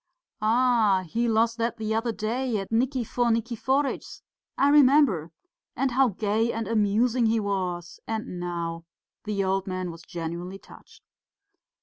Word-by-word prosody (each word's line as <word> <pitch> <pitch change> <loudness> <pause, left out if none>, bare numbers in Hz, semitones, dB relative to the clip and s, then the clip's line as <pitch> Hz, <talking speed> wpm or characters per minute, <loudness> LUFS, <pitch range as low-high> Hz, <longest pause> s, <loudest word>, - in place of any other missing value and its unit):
"Ah, 220 -4 +3
he 235 +8 0
lost 230 +1 +2
that 230 0 -1
the 220 -1 -2
other 225 +1 0
day 230 +2 -2
at 195 +1 -5
Nikifor 245 0 +1
Nikiforitch's. 240 +5 -1 0.3
I 280 - +4
remember. 275 - +5 0.5
And 270 -1 0
how 265 +2 +4
gay 220 +2 0
and 225 -2 -3
amusing 225 +3 +2
he 225 0 +2
was 180 -4 -3
and 220 -5 -4
now!" 170 -1 -4 0.4
The 205 -2 -1
old 190 +1 0
man 185 -1 -3
was 165 0 -11
genuinely 170 +2 -6
touched. - - -17
220 Hz, 135 wpm, -26 LUFS, 190-240 Hz, 0.5 s, remember